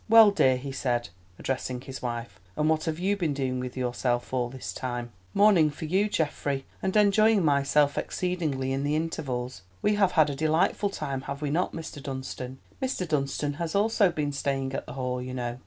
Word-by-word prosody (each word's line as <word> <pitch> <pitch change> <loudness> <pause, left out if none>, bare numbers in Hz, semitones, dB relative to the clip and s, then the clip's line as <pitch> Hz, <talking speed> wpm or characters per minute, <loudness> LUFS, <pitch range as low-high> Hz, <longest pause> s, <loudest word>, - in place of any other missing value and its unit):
"Well, 225 -2 +9
dear," 130 -10 +4
he 135 +2 -6
said, 125 -3 -1 0.3
addressing 130 -1 -3
his 135 0 -8
wife, 120 -1 -4 0.2
"and 150 - +2
what 160 +1 +2
have 160 -1 -1
you 190 +4 +1
been 165 -7 -1
doing 130 -2 -1
with 125 0 -5
yourself 125 0 -1
all 125 -2 0
this 130 +1 -6
time?" 120 -2 -4 0.2
"Mourning 200 -7 +6
for 150 +2 -6
you, 190 +6 +2
Geoffrey, 145 -5 -1 0.2
and 190 +1 -1
enjoying 210 -1 +5
myself 145 0 +3
exceedingly 155 -8 -1
in 135 - -1
the 145 +1 +1
intervals. 130 - -3 0.2
We 210 - +4
have 195 -3 +3
had 155 -3 +4
a - - -4
delightful 160 +7 +2
time, 140 -7 -3
have 140 +2 -4
we 145 - -1
not, 175 +4 0
Mr. 160 -3 -7
Dunstan? 130 -1 -5 0.2
Mr. 255 -9 -1
Dunstan 145 -1 0
has 165 +1 -2
also 205 -2 +3
been 150 -3 -1
staying 135 -1 -1
at - - -4
the - - -7
Hall, 125 -1 -2
you 130 0 -5
know." 120 -1 -3
145 Hz, 195 wpm, -27 LUFS, 130-170 Hz, 0.3 s, Well